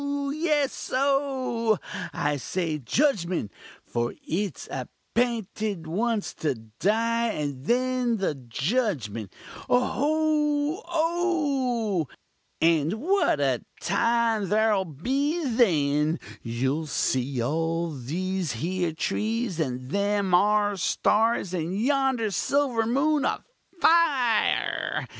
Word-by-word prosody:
yes! 300 Hz, -3 st, 0 dB
oh! 260 Hz, -5 st, +1 dB, 0.3 s
I 145 Hz, 0 st, -1 dB
say 160 Hz, +1 st, -2 dB
judgment 175 Hz, -, 0 dB, 0.3 s
for 120 Hz, 0 st, -2 dB
it's 175 Hz, -, -2 dB
appinted 215 Hz, -, -2 dB
once 215 Hz, +6 st, -1 dB
to 145 Hz, -4 st, -1 dB
die 220 Hz, -, 0 dB
and 145 Hz, -, -3 dB
then 250 Hz, 0 st, +1 dB
the 190 Hz, -6 st, 0 dB
judgment 130 Hz, -, -2 dB, 0.4 s
oho! 300 Hz, -, +1 dB
oh! 290 Hz, -, 0 dB, 0.5 s
And 165 Hz, 0 st, +3 dB
what 345 Hz, -, +1 dB
a 135 Hz, -4 st, +1 dB, 0.2 s
time 230 Hz, 0 st, +1 dB
ther'll 210 Hz, -2 st, +3 dB
be 275 Hz, -, -1 dB
then! 155 Hz, -, +2 dB, 0.2 s
You'll 130 Hz, +7 st, -1 dB
see 130 Hz, -2 st, 0 dB
all 165 Hz, +5 st, -1 dB
these 170 Hz, +6 st, -3 dB
here 170 Hz, +6 st, -1 dB
trees 215 Hz, +2 st, -1 dB
and 130 Hz, -3 st, -3 dB
them 200 Hz, -1 st, +1 dB
'are 205 Hz, +2 st, +3 dB
stars, 210 Hz, +1 st, +1 dB
and 180 Hz, +3 st, -2 dB
yonder 265 Hz, -3 st, +1 dB
silver 245 Hz, +2 st, +1 dB
moon 285 Hz, +4 st, +2 dB
afire! 325 Hz, -, +1 dB
210 Hz, 95 wpm, -26 LUFS, 160-255 Hz, 0.5 s, And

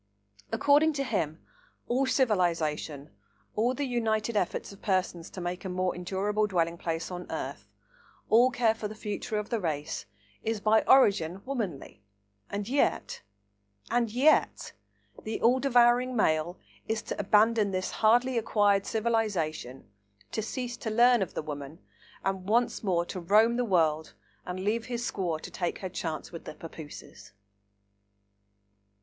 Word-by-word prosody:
According 295 Hz, +2 st, +4 dB
to 275 Hz, -1 st, -1 dB
him, 160 Hz, -, -2 dB, 0.4 s
all 260 Hz, +2 st, +1 dB
civilisation, 165 Hz, -, 0 dB, 0.4 s
all 240 Hz, +4 st, +1 dB
the 285 Hz, -, -2 dB
united 225 Hz, -3 st, -1 dB
efforts 195 Hz, -1 st, -1 dB
of 200 Hz, -, -14 dB
persons 185 Hz, -3 st, -1 dB
to -, -, -9 dB
make 175 Hz, +1 st, -4 dB
a 190 Hz, -, -4 dB
more 185 Hz, 0 st, 0 dB
endurable 200 Hz, +4 st, -1 dB
dwelling 170 Hz, -4 st, 0 dB
place 165 Hz, +1 st, -3 dB
on 180 Hz, 0 st, -6 dB
earth, -, -, -5 dB, 0.6 s
all 240 Hz, +3 st, +5 dB
care 240 Hz, -3 st, +2 dB
for 225 Hz, -1 st, -5 dB
the 215 Hz, -, -9 dB
future 210 Hz, 0 st, -4 dB
of 210 Hz, 0 st, -4 dB
the 230 Hz, -, +1 dB
race, 155 Hz, -, -3 dB, 0.4 s
is 220 Hz, -1 st, -1 dB
by 220 Hz, +1 st, +4 dB
origin 195 Hz, -8 st, +4 dB
womanly, 205 Hz, -, -4 dB, 0.5 s
and 200 Hz, 0 st, -4 dB
yet—and 100 Hz, -, -2 dB
yet—the 245 Hz, -3 st, -1 dB
all 245 Hz, +3 st, +4 dB
devouring 245 Hz, -1 st, +4 dB
male 165 Hz, -4 st, +1 dB, 0.3 s
is 220 Hz, 0 st, -1 dB
to -, -, -5 dB
abandon 210 Hz, +1 st, +3 dB
this 185 Hz, -1 st, -2 dB
hardly 240 Hz, +3 st, +3 dB
acquired 205 Hz, -3 st, +2 dB
civilisation, 205 Hz, -, -1 dB, 0.4 s
to -, -, -2 dB
cease 245 Hz, +2 st, -4 dB
to 225 Hz, -, -4 dB
learn 240 Hz, +1 st, +5 dB
of 190 Hz, -, -3 dB
the -, -, -2 dB
woman, 145 Hz, 0 st, -7 dB, 0.5 s
and 190 Hz, 0 st, -2 dB
once 235 Hz, +2 st, +2 dB
more 175 Hz, -4 st, +1 dB
to 185 Hz, -, -6 dB
roam 215 Hz, +7 st, +4 dB
the 245 Hz, -, +1 dB
world 160 Hz, -, +1 dB, 0.3 s
and 180 Hz, +1 st, -4 dB
leave 220 Hz, +4 st, 0 dB
his 240 Hz, -1 st, -3 dB
squaw 175 Hz, -8 st, -2 dB
to -, -, -9 dB
take 175 Hz, -2 st, -2 dB
her 190 Hz, -, -5 dB
chance 165 Hz, -3 st, -4 dB
with 170 Hz, -, -9 dB
the -, -, -8 dB
papooses! 155 Hz, -, -11 dB
205 Hz, 145 wpm, -29 LUFS, 170-235 Hz, 0.6 s, all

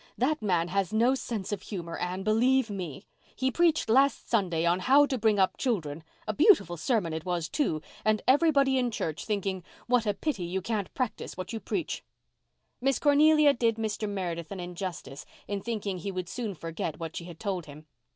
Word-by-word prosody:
That 290 Hz, +4 st, +1 dB
man 175 Hz, -5 st, +1 dB
has 195 Hz, +1 st, 0 dB
no 235 Hz, +4 st, +3 dB
sense 230 Hz, -7 st, -4 dB
of 205 Hz, -2 st, -2 dB
humour, 170 Hz, -5 st, -6 dB
Anne, 180 Hz, +2 st, -3 dB
believe 235 Hz, +3 st, +3 dB
me. 180 Hz, -8 st, -5 dB, 0.3 s
He 260 Hz, 0 st, 0 dB
preached 330 Hz, -1 st, +2 dB
last 270 Hz, +5 st, +3 dB
Sunday 175 Hz, -7 st, +1 dB
on 175 Hz, +2 st, +3 dB
'How 275 Hz, +8 st, +5 dB
to 280 Hz, -, -2 dB
Bring 220 Hz, -3 st, +2 dB
up 190 Hz, -1 st, +2 dB
Children.' 165 Hz, -, -2 dB, 0.2 s
A 215 Hz, -, 0 dB
beautiful 295 Hz, -, +5 dB
sermon 180 Hz, -2 st, 0 dB
it 160 Hz, 0 st, -4 dB
was, 175 Hz, -3 st, -2 dB
too—and 215 Hz, -, -1 dB
everybody 275 Hz, -2 st, +4 dB
in 250 Hz, -1 st, +1 dB
church 160 Hz, -8 st, -4 dB
thinking 195 Hz, -3 st, -2 dB, 0.2 s
'what 240 Hz, -2 st, +2 dB
a 205 Hz, -, +1 dB
pity 240 Hz, -, -2 dB
you 180 Hz, +3 st, -2 dB
can't 205 Hz, 0 st, -3 dB
practise 255 Hz, -4 st, -3 dB
what 185 Hz, +5 st, -5 dB
you 225 Hz, -, -3 dB
preach.'" 335 Hz, -, -3 dB, 0.8 s
Miss 270 Hz, +1 st, +2 dB
Cornelia 300 Hz, 0 st, +5 dB
did 230 Hz, -2 st, +1 dB
Mr. 215 Hz, -1 st, -2 dB
Meredith 175 Hz, -4 st, -4 dB
an 195 Hz, -, -5 dB
injustice 175 Hz, -6 st, -6 dB, 0.2 s
in 200 Hz, -1 st, -3 dB
thinking 205 Hz, -5 st, -3 dB
he 195 Hz, +3 st, -4 dB
would 185 Hz, -2 st, -4 dB
soon 225 Hz, -6 st, -4 dB
forget 165 Hz, -1 st, -5 dB
what 165 Hz, -1 st, -6 dB
she 170 Hz, -, -5 dB
had 170 Hz, -2 st, -10 dB
told 185 Hz, -6 st, -3 dB
him. 150 Hz, +2 st, -12 dB
205 Hz, 190 wpm, -28 LUFS, 175-250 Hz, 0.8 s, How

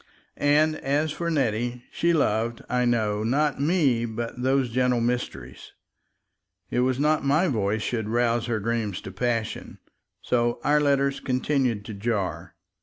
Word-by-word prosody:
And 155 Hz, +2 st, +3 dB
as 145 Hz, +3 st, 0 dB
for 170 Hz, +3 st, -3 dB
Nettie, 120 Hz, -4 st, -1 dB
she 170 Hz, -, +1 dB
loved, 115 Hz, -7 st, 0 dB
I 125 Hz, 0 st, +1 dB
know, 110 Hz, -3 st, +1 dB
not 140 Hz, +4 st, +1 dB
me 140 Hz, -7 st, +2 dB
but 115 Hz, +2 st, -5 dB
those 130 Hz, -1 st, +1 dB
gentle 125 Hz, 0 st, +2 dB
mysteries. 115 Hz, -, -4 dB, 1.0 s
It -, -, 0 dB
was 130 Hz, +1 st, +1 dB
not 150 Hz, +1 st, +2 dB
my 150 Hz, +6 st, +3 dB
voice 110 Hz, -, 0 dB
should 110 Hz, -3 st, -2 dB
rouse 120 Hz, 0 st, +1 dB
her 115 Hz, -2 st, -1 dB
dreams 110 Hz, -3 st, -2 dB
to 95 Hz, -, -8 dB
passion... 115 Hz, +2 st, -3 dB, 0.5 s
So 120 Hz, -1 st, +1 dB
our 150 Hz, +1 st, +3 dB
letters 140 Hz, -1 st, +2 dB
continued 130 Hz, -4 st, 0 dB
to 110 Hz, -, -6 dB
jar. 100 Hz, -6 st, -3 dB
120 Hz, 145 wpm, -25 LUFS, 115-140 Hz, 1.0 s, And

